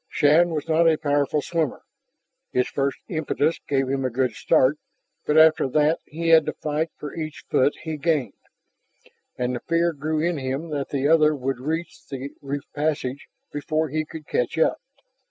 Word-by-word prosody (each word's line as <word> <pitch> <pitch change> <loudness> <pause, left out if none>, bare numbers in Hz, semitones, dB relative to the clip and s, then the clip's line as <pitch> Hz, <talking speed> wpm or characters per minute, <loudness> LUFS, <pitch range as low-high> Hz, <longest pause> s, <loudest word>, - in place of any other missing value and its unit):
Shann 155 +4 +4
was 155 -2 -3
not 165 +1 +4
a 160 - +2
powerful 145 0 0
swimmer. 160 -6 -2 0.7
His 125 - +1
first 140 0 -1
impetus 155 -1 0
gave 135 -2 +1
him 135 0 -1
a 130 - +1
good 125 +1 0
start, 135 +7 +2 0.5
but 150 - +3
after 160 -2 +6
that 150 +3 +2
he 165 +2 -3
had 160 -2 +6
to - - -1
fight 155 +2 -2
for 150 - -7
each 155 -3 -6
foot 135 +3 +3
he 160 -1 -4
gained, 145 - 0 1.0
and 125 0 -1
the - - -3
fear 170 +2 +1
grew 155 +2 -2
in 165 -1 0
him 135 +5 -3
that 145 -2 -3
the 140 0 0
other 155 -1 +5
would 135 -2 -3
reach 160 +5 -4
the 135 0 -6
reef 140 0 -4
passage 145 0 -2 0.3
before 155 +2 -1
he 155 +3 -1
could 155 0 -10
catch 125 0 -1
up. 160 - +2
150 Hz, 175 wpm, -24 LUFS, 135-160 Hz, 1.0 s, after